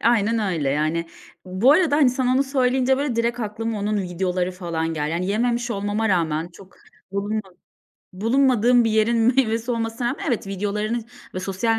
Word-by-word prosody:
Aynen 230 -1 +2
öyle 150 -5 -1
yani. 155 +3 0 0.4
Bu 190 +9 +3
arada, 315 -2 +3
hani, 280 -4 +5
sen 255 0 -1
onu 255 +2 +3
söyleyince 265 -1 +1
böyle 275 -3 -2
direkt 235 +1 0
aklıma 220 +1 -3
onun 205 0 -1
videoları 180 0 -2
falan 165 -3 -3
geldi. 150 0 -2
Hani, 180 +2 -1
yememiş 240 +3 0
olmama 205 +1 -1
rağmen, 165 -3 0
çok 185 +2 -16 0.4
bulunma 205 +2 -1 0.7
bulunmadığım 240 +2 +3
bir 225 - +1
yerin 220 +2 +2 0.2
meyvesi 230 -2 +1
olmasına 230 +1 -2
rağmen, 260 - -4
evet, 235 -5 -1
videolarını 210 +4 -2 0.3
ve 185 - -3
sosyal 225 +4 0
220 Hz, 165 wpm, -22 LUFS, 185-240 Hz, 0.7 s, hani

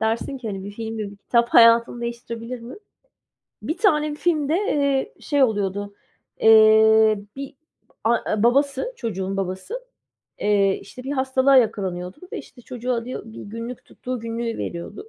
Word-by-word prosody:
dersin 225 +5 -1
ki 235 -3 -6
"Hani, 195 -2 -5
1 200 - -6
film 225 +1 -6
ve 210 -2 -4
1 200 - -14
kitap 235 +4 +1
hayatını 230 +1 +5
değiştirebilir 235 0 -6
mi?" 235 +2 -9 0.9
1 315 - -3
tane 305 -7 +2
filmde, 305 -2 0
eee, 290 - 0
şey 285 -2 +2
oluyordu. 205 -3 -1 0.5
Eee, 220 -1 +6 0.2
bir 275 0 -7 0.5
a 225 -2 +1
babası, 275 - +2
çocuğun 195 - -4
babası, 190 - -4 0.6
eee, 200 -2 +2
işte, 250 +5 -11
bir 270 +2 -4
hastalığa 265 0 +3
yakalanıyordu 190 -6 0 0.2
ve - - -3
işte, 245 - -13
çocuğu 250 +1 -4
alıyor, 235 +2 -4
1 220 - -10
günlük 230 +4 -7
tuttuğu 255 -1 -6
günlüğü 230 0 -4
veriyordu. 175 - -6
230 Hz, 145 wpm, -23 LUFS, 215-265 Hz, 0.9 s, Eee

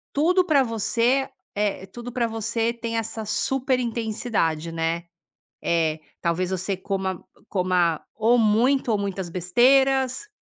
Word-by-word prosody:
tudo 360 +6 +4
pra 290 -5 +4
você 235 +3 +1 0.3
eh, 205 -2 -1
tudo 240 +5 -8
pra 240 -1 0
você 225 +1 -1
tem 230 -1 -4
essa 225 0 -3
super 260 +4 0
intensidade, 220 -9 -1
né. 165 +1 -2 0.6
É, 160 -2 +1 0.2
talvez 175 +2 0
você 190 +1 -2
coma 190 -1 -3 0.3
coma 180 -4 +1
ou 230 +2 +3
muito 235 +4 +3
ou 210 - +2
muitas 195 -2 -3
besteiras 260 - +3
220 Hz, 125 wpm, -24 LUFS, 185-245 Hz, 0.6 s, tudo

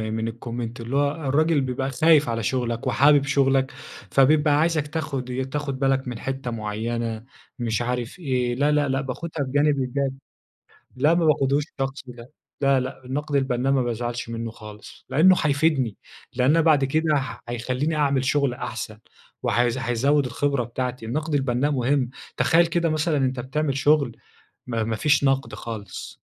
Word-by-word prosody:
من 115 0 -2
الcomment 120 0 -6
اللي 120 +4 -4
هو 140 0 +3 0.2
الراجل 155 +2 +3
بيبقى 130 +1 -2
خايف 150 0 +4
على 115 -1 -2
شغلك، 120 +1 -1
وحابب 145 0 +5
شغلك، 135 -1 +2 0.4
فبيبقى 145 +2 +4
عايزك 155 -2 +1
تاخد 150 -5 -4
ي 130 +1 -2
تاخد 140 0 -4
بالك 135 -1 +1
من 120 -2 -5
حتّة 135 -2 -4
معينة، 115 +1 -3 0.4
مش 115 -1 -1
عارف 125 +4 -3
إيه 125 -6 -1
لا، 145 +3 +2
لا، 150 -1 +2
لأ، 135 +1 0
باخدها 150 +3 -4
بجانب 145 +2 +2
إيجابي. 135 +1 -1 0.8
لأ، 145 +5 +3
ما 170 -1 +2
باخدهوش 140 -1 +2 0.2
شخصي 135 -1 -4
لأ، 120 0 -12 0.3
لا، 140 -1 +4
لأ، 130 0 -6
النقد 145 +3 -3
البنَّاء 135 0 +1
ما 130 - +2
بازعلش 120 0 -3
منُّه 115 0 -4
خالص. 105 -2 -12
لأنه 185 +6 +6
هيفيدني، 140 -6 +1 0.4
لأن 135 +6 +3
بعد 155 -4 +4
كده 155 +3 +1
ه 130 -2 -4
هيخليني 125 +6 -1
أعمل 140 -3 +1
شغل 140 -1 +1
أحسن، 110 -4 -6 0.5
و - - +1
هـيز 120 0 +2
هيزود 130 +4 +1
الخبرة 135 +1 0
بتاعتي، 125 0 -4
النقد 155 +7 -3
البنَّاء 135 0 +1
مهم، 130 -1 +1 0.3
تخيَّل 170 +1 +4
كده 170 0 0
مثلًا 155 0 +1
أنتَ 130 -2 0
بتعمل 135 +2 -1
شغل 145 -4 +2 0.5
ما 115 -2 -1
ما 110 0 -1
فيش 145 +5 +2
نقد 135 0 +1
خالص، 105 -5 -8
135 Hz, 160 wpm, -24 LUFS, 120-145 Hz, 0.8 s, لأنه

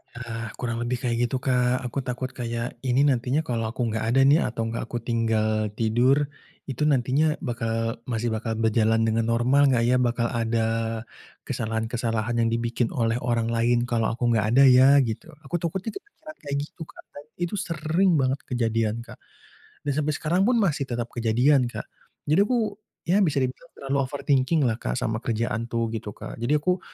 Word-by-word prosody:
Ya, 115 -1 -5
kurang 115 -2 -3
lebih 120 +2 -2
kayak 120 0 +1
gitu 130 - -3
Kak, 125 -1 +1
aku 125 +2 -3
takut 130 0 -4
kayak 120 0 -4
ini 130 +2 +2
nantinya 135 +2 +1
kalau 115 -5 -2
aku 115 0 -2
gak 110 0 -2
ada 135 - +6
nih, 145 +4 +6
atau 115 -1 -3
gak 115 0 -4
aku 120 -1 -5
tinggal 110 -2 0
tidur, 130 +6 +2 0.3
itu 135 +1 -4
nantinya 145 +3 +2
bakal 115 -2 -2
masih 115 -1 -1
bakal 110 0 -2
berjalan 110 0 +2
dengan 115 0 +1
normal 125 +5 +3
gak 120 -3 +2
ya? 125 +2 +3
Bakal 120 -1 0
ada 115 -1 0 0.8
kesalahan-kesalahan 115 0 -2
yang 115 0 +2
dibikin 115 0 0
oleh 115 -1 +1
orang 115 -2 0
lain 120 +1 +2
kalau 115 -2 0
aku 120 -1 0
gak 110 -2 +2
ada 140 - +7
ya? 130 +1 +7
Gitu 110 +6 -4 0.2
aku 175 +6 -3
takutnya 185 +6 -3
kepikiran 315 -6 -14
kayak 140 -2 -4
gitu 160 +3 -13
Kak, - - -15
dan 145 - -11 0.2
itu 175 +4 -2
sering 165 +3 +1
banget 135 -1 +1
kejadian 115 -3 0
Kak, - - -13 0.7
dan 145 - +1
sampai 155 +1 0
sekarang 175 +4 0
pun 250 - +3
masih 155 -10 0
tetap 120 -1 -2
kejadian 125 +3 +3
Kak. - - -6 0.4
Jadi 155 +7 +3
aku 215 -1 +1 0.3
ya 185 +4 +3
bisa 155 -7 +1
dibilang 130 - -2
terlalu 140 0 -2
overthinking-lah 135 -2 +1
Kak - - -2
sama 110 -3 -2
kerjaan 115 -1 -2
tuh 115 -1 -1
gitu 110 -2 -4
Kak. 105 - -9
Jadi 145 +6 +2
aku 180 +5 0
120 Hz, 180 wpm, -25 LUFS, 115-140 Hz, 0.8 s, ada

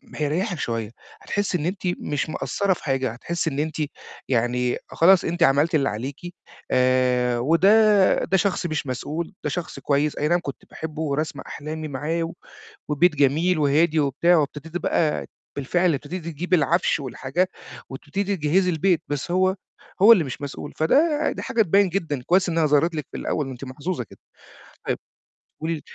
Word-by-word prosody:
هيريحِك 160 +4 -1
شوية، 115 -2 -3 0.3
هتحسّي 205 -3 -1
إن 155 - -4
أنتِ 190 +2 -3 0.2
مش 145 +1 -2
مقصرة 195 +4 0
في - - -12
حاجة، 135 -4 0
هتحسّي 165 +7 -3
إن 140 0 -4
أنتِ 155 +1 -2 0.5
يعني 125 0 +1
خلاص 185 +2 +5
أنتِ 170 +1 0
عملتِ 150 +4 +3
اللي 140 -2 +2
عليكِ، 130 +6 -5 0.5
آآ، 125 -1 +2
وده 195 - +4
ده 190 +2 +2
شخص 185 -1 0
مش 155 -4 -2
مسؤول، 155 - -4
ده 150 - -1
شخص 170 +4 -5
كويس، 145 +1 0
أينعم 170 +4 +2
كنت 140 - -7
باحبه 160 0 -6
ورسمة 155 +1 -2
أحلامي 155 +1 -6
معاه 150 +4 -2
و 165 +1 -5 0.6
وبيت 155 +2 +3
جميل 155 +5 +2
وهادي 155 +2 +3
وبتاع، 160 +5 +3
وابتديتِ 155 +2 -2
بقى 160 -3 0 0.3
بالفعل 175 +4 +1
ابتديتِ 155 +5 -5
تجيبي 170 +3 0
العَفش 160 0 +1
والحاجات، 140 +7 -2 0.4
وابتديتِ 160 +9 -4
تجهزي 180 +5 +2
البيت، 170 +1 +1
بس 145 +4 -3
هو 185 +1 +2 0.5
هو 230 +3 +10
اللي 175 -8 +5
مش 135 +2 -7
مسؤول، 145 +1 -6
فده 295 - +2
ده - - -6
حاجة 230 - +2
تبيِّن 200 +1 +3
جدًا، 160 -8 -2
كويس 185 +1 +3
إنها 165 -2 +2
ظهرت 150 +3 +2
لِك 150 -3 -4
في - - -5
الأول، 145 -3 -2
أنتِ 130 +1 -8
محظوظة 135 +1 -4
كده، - - -17 0.7
طيب - - 0 0.6
قولي 165 +1 -1
لي 150 - -8
155 Hz, 165 wpm, -23 LUFS, 140-175 Hz, 0.7 s, هو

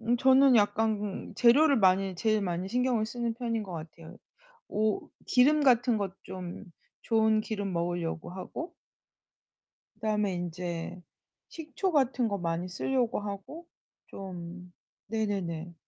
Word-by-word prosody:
음 235 +2 +1
저는 265 +1 +6
약간 210 -1 0
재료를 275 +5 +6
많이 190 -2 +3
제일 215 +2 +1
많이 180 0 -2
신경을 245 -1 +1
쓰는 235 0 -3
편인 230 -2 -2
거 190 -3 -8
같아요. 165 +2 -9 0.5
오 215 0 0 0.2
기름 290 +5 +4
같은 245 -3 +4
것 200 -3 -2
좀 180 +1 -7 0.4
좋은 220 -1 +3
기름 205 -3 -3
먹으려고 170 -1 -2
하고 190 - -7 1.2
그다음에 210 -2 0
인제 175 0 -5 0.5
식초 325 +4 -3
같은 260 -5 +2
거 200 -2 -1
많이 170 0 -2
쓸려고 245 +5 0
하고 205 - -7 0.4
좀 180 -1 -8 0.4
네네네. 190 -6 -2
210 Hz, 240 characters per minute, -29 LUFS, 180-240 Hz, 1.2 s, 저는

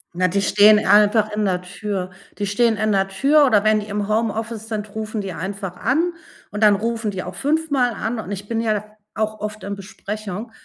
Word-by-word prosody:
Na, 185 +1 +2
die 195 +3 0
stehen 210 +2 +6
einfach 210 +1 +4
in 210 0 -1
der 180 -2 0
Tür. 190 0 -4 0.3
Die 205 - -1
stehen 220 +3 +2
in 215 0 +1
der 195 -1 +2
Tür 280 +10 +4
oder 210 -5 +3
wenn 215 0 +3
die 210 - -7
im 205 -1 -2
Homeoffice 220 0 -2
sind, 210 -2 -5
rufen 220 -1 -4
die 190 -2 -5
einfach 190 +2 -5
an 325 - 0 0.4
und 210 +1 -2
dann 210 -1 +6
rufen 225 +1 -2
die 190 -2 -4
auch 180 - -7
5 310 - -1
Mal 250 -3 +2
an. 225 +1 -3
Und 205 -2 -6
ich 200 +1 -6
bin 230 0 -1
ja 215 -2 -1 0.3
auch 215 0 -2
oft 210 -1 -6
in 200 0 -4
Besprechung. 205 +2 -7
210 Hz, 215 wpm, -21 LUFS, 200-225 Hz, 0.4 s, stehen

